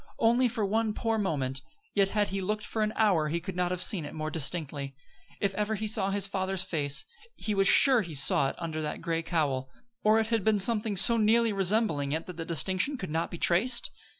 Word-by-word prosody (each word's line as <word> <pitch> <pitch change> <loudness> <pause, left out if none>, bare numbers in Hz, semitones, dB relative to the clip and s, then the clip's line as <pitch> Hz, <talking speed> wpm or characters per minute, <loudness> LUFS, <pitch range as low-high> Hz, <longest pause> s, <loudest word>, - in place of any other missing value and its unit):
Only 240 +3 +3
for 225 -3 -2
one 215 +1 -1
poor 225 -1 -1
moment; 135 -9 -2 0.3
yet 195 -1 +2
had 210 0 0
he 195 0 -3
looked 210 +3 -3
for 220 - -3
an 215 0 0
hour 190 -9 +2
he 165 +3 -2
could 185 +1 -7
not 180 0 0
have 180 0 0
seen 185 -6 +3
it 145 - -8
more 155 0 -4
distinctly. 145 -3 0 0.4
If 200 -1 -1
ever 210 +2 -1
he 215 +1 -4
saw 205 -2 +2
his 200 -1 +3
father's 190 -1 -2
face, 145 -6 -1 0.3
he 215 - -3
was 195 -1 +2
sure 265 -4 +5
he 170 -6 -7
saw 140 0 +4
it - - -8
then - - -8
under 160 -1 -4
that 150 -1 -5
gray 165 -1 -2
cowl. 145 -6 -1 0.3
Or 215 +1 +4
it 220 - +2
had 225 -3 0
been 220 0 +2
something 215 +1 +1
so 230 +5 +5
nearly 225 +1 +3
resembling 195 -8 0
it 160 +1 -3
that 180 -2 -9
the 165 - -5
distinction 185 - -1
could 185 -9 -6
not 165 +2 -1
be 175 - -7
traced? 220 +10 +2
195 Hz, 230 wpm, -28 LUFS, 160-215 Hz, 0.4 s, sure